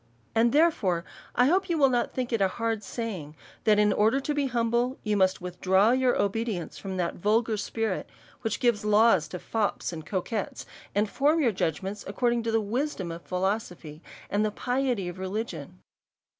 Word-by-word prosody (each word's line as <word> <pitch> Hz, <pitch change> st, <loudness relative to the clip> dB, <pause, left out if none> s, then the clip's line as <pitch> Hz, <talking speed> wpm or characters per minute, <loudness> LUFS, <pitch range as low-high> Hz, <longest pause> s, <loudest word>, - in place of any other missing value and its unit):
And, 230 Hz, +1 st, +3 dB
therefore, 230 Hz, -, +2 dB, 0.3 s
I 245 Hz, -, +5 dB
hope 375 Hz, +6 st, +2 dB
you 335 Hz, -, +1 dB
will 280 Hz, -3 st, +6 dB
not 245 Hz, -2 st, 0 dB
think 250 Hz, -1 st, -3 dB
it 225 Hz, -, +1 dB
a 195 Hz, -, +5 dB
hard 225 Hz, +2 st, -2 dB
saying, 190 Hz, -10 st, -5 dB, 0.3 s
that 215 Hz, -1 st, +5 dB
in 210 Hz, 0 st, +4 dB
order 220 Hz, +6 st, +3 dB
to 295 Hz, +2 st, -2 dB
be 290 Hz, -1 st, 0 dB
humble, 240 Hz, +1 st, 0 dB
you 210 Hz, -1 st, 0 dB
must 190 Hz, -2 st, +2 dB
withdraw 190 Hz, +4 st, +2 dB
your 255 Hz, 0 st, +2 dB
obedience 200 Hz, -4 st, -1 dB
from 190 Hz, -1 st, -5 dB
that 175 Hz, -2 st, -1 dB
vulgar 220 Hz, +4 st, +2 dB
spirit 220 Hz, +2 st, -2 dB, 0.3 s
which 225 Hz, -3 st, -2 dB
gives 235 Hz, -4 st, +2 dB
laws 210 Hz, -6 st, +4 dB
to 165 Hz, -, -6 dB
fops 210 Hz, -1 st, -2 dB
and 160 Hz, -1 st, -6 dB
coquettes, 200 Hz, +3 st, -3 dB, 0.3 s
and 210 Hz, +1 st, +2 dB
form 295 Hz, +8 st, +2 dB
your 255 Hz, -7 st, +3 dB
judgments 190 Hz, +2 st, -2 dB
according 235 Hz, +3 st, +1 dB
to 225 Hz, 0 st, -2 dB
the 225 Hz, -, +3 dB
wisdom 215 Hz, -, -2 dB
of 165 Hz, +1 st, -7 dB
philosophy, 180 Hz, -5 st, -3 dB, 0.3 s
and 205 Hz, +1 st, +1 dB
the 215 Hz, -, +1 dB
piety 245 Hz, -3 st, -1 dB
of 175 Hz, +1 st, -7 dB
religion. 205 Hz, +5 st, -4 dB
215 Hz, 180 wpm, -27 LUFS, 190-240 Hz, 0.3 s, will